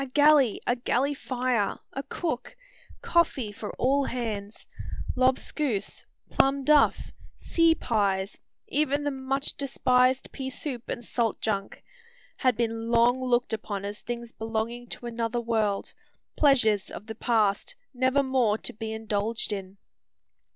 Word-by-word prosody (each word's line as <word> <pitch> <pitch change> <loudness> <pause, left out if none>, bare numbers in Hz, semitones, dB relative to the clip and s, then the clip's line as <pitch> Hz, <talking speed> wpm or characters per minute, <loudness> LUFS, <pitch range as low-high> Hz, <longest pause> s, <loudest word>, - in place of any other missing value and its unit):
A - - -5
galley; 290 -3 +5
a 245 - +2
galley 255 +3 0
fire; 250 -6 -1 0.2
a 270 - -3
cook; 285 - -4 0.5
coffee 280 -10 +2
for 205 +1 -7
all 275 +2 +2
hands; 220 -4 -4 0.5
lobscouse; 255 -3 0 0.3
plum 275 0 +3
duff; 300 +1 +4 0.2
sea 330 -1 +3
pies; 200 -6 0 0.3
even 290 0 +1
the 290 - 0
much 270 +1 -2
despised 255 -2 +2
pea 265 -1 -5
soup 255 -2 -5
and 240 - -4
salt 230 -2 0
junk, 200 -3 -3 0.5
had 255 -4 +2
been 230 -1 -1
long 240 +2 +4
looked 245 -2 +1
upon 205 -2 -3
as 205 +1 -5
things 235 -1 -5
belonging 225 +2 -3
to 240 - -8
another 235 0 -2
world, 220 -4 -1 0.4
pleasures 230 -9 +3
of 205 - -8
the 220 - -6
past, 215 -4 +1 0.2
never 260 +2 +2
more 255 -5 +2
to - - -4
be 220 +1 -5
indulged 220 0 -2
in! 195 -1 -6
240 Hz, 135 wpm, -27 LUFS, 220-265 Hz, 0.5 s, galley